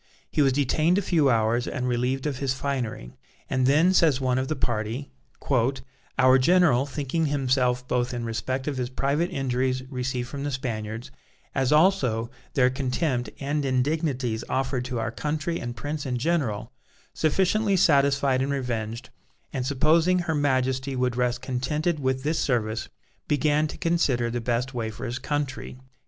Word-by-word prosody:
He -, -, +2 dB
was 135 Hz, -2 st, +4 dB
detained 155 Hz, +6 st, +2 dB
a -, -, +2 dB
few 160 Hz, -7 st, +3 dB
hours 115 Hz, +1 st, +2 dB
and 125 Hz, -2 st, -2 dB
relieved 125 Hz, +2 st, 0 dB
of 140 Hz, -4 st, -2 dB
his 135 Hz, -2 st, 0 dB
finery, 125 Hz, -, -3 dB, 0.4 s
and 130 Hz, -1 st, +2 dB
then, 160 Hz, +7 st, +4 dB
says 155 Hz, -7 st, +4 dB
one 130 Hz, -1 st, +1 dB
of 130 Hz, -, -2 dB
the 155 Hz, -, -1 dB
party: 120 Hz, +2 st, -2 dB, 1.1 s
"Our 130 Hz, 0 st, +6 dB
general, 145 Hz, -3 st, +4 dB
thinking 150 Hz, +3 st, -1 dB
himself 130 Hz, -3 st, +1 dB
both 125 Hz, -1 st, 0 dB
in 120 Hz, -2 st, -4 dB
respect 130 Hz, +4 st, -3 dB
of 145 Hz, -3 st, -2 dB
his 125 Hz, -1 st, -2 dB
private 140 Hz, +6 st, 0 dB
injuries 130 Hz, -4 st, -1 dB
received 125 Hz, -1 st, -2 dB
from 140 Hz, +1 st, -6 dB
the 145 Hz, -, -1 dB
Spaniards, 120 Hz, -2 st, -4 dB, 0.4 s
as 135 Hz, 0 st, +1 dB
also 140 Hz, -, +3 dB, 0.2 s
their 125 Hz, -3 st, +4 dB
contempt 130 Hz, -2 st, -1 dB
and 145 Hz, +1 st, -1 dB
indignities 130 Hz, -3 st, 0 dB
offered 130 Hz, -1 st, -1 dB
to 125 Hz, -1 st, -3 dB
our 115 Hz, 0 st, -2 dB
country 155 Hz, +6 st, -2 dB
and 120 Hz, -1 st, -5 dB
prince 145 Hz, +2 st, -4 dB
in 125 Hz, -1 st, -1 dB
general, 125 Hz, -7 st, -1 dB, 0.4 s
sufficiently 195 Hz, +5 st, +2 dB
satisfied 140 Hz, -4 st, +3 dB
and 135 Hz, +1 st, 0 dB
revenged, 120 Hz, -3 st, -3 dB, 0.4 s
and 130 Hz, -2 st, -2 dB
supposing 160 Hz, +6 st, +3 dB
her 175 Hz, -2 st, -1 dB
Majesty 130 Hz, -2 st, 0 dB
would 125 Hz, -1 st, 0 dB
rest 125 Hz, 0 st, 0 dB
contented 150 Hz, +6 st, -1 dB
with 130 Hz, -1 st, -1 dB
this 155 Hz, +2 st, 0 dB
service, 110 Hz, -4 st, -1 dB, 0.4 s
began 150 Hz, +1 st, +2 dB
to -, -, -8 dB
consider 135 Hz, -9 st, +1 dB
the 120 Hz, 0 st, -2 dB
best 120 Hz, +3 st, -1 dB
way 115 Hz, -3 st, -2 dB
for 110 Hz, +4 st, -7 dB
his 120 Hz, +1 st, -3 dB
country." 145 Hz, -4 st, -3 dB
130 Hz, 160 wpm, -25 LUFS, 125-145 Hz, 1.1 s, Our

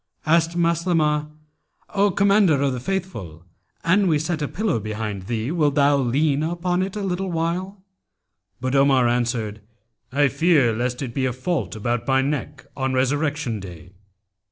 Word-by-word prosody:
Asked 165 Hz, +2 st, +2 dB
Maslamah, 165 Hz, -3 st, +1 dB, 0.6 s
'O 200 Hz, 0 st, +3 dB
Commander 200 Hz, -5 st, +3 dB
of 135 Hz, -2 st, +1 dB
the 125 Hz, -, -3 dB
Faithful, 125 Hz, -, -5 dB, 0.4 s
an 190 Hz, +4 st, +3 dB
we 160 Hz, -3 st, +3 dB
set 160 Hz, +1 st, -2 dB
a 145 Hz, -, 0 dB
pillow 200 Hz, -, -1 dB
behind 105 Hz, -2 st, -5 dB
thee, 115 Hz, +3 st, -2 dB
wilt 150 Hz, -4 st, +1 dB
thou 145 Hz, -1 st, +4 dB
lean 140 Hz, +3 st, +1 dB
on 175 Hz, +2 st, -1 dB
it 190 Hz, +1 st, -3 dB
a 210 Hz, -, -3 dB
little 190 Hz, 0 st, -2 dB
while?' 180 Hz, +4 st, -3 dB, 0.7 s
But 130 Hz, +1 st, -2 dB
Omar 135 Hz, -3 st, +4 dB
answered, 120 Hz, -3 st, -1 dB, 0.5 s
'I 140 Hz, +1 st, +3 dB
fear 150 Hz, -7 st, +3 dB
lest 125 Hz, +3 st, -2 dB
it 120 Hz, -3 st, -5 dB
be 130 Hz, 0 st, 0 dB
a 125 Hz, -, -2 dB
fault 140 Hz, +3 st, -2 dB
about 120 Hz, +2 st, -2 dB
my 135 Hz, 0 st, +3 dB
neck 140 Hz, 0 st, -3 dB
on 130 Hz, -1 st, -1 dB
Resurrection 145 Hz, -2 st, 0 dB
Day.' 90 Hz, -2 st, -10 dB
145 Hz, 155 wpm, -22 LUFS, 125-170 Hz, 0.7 s, thou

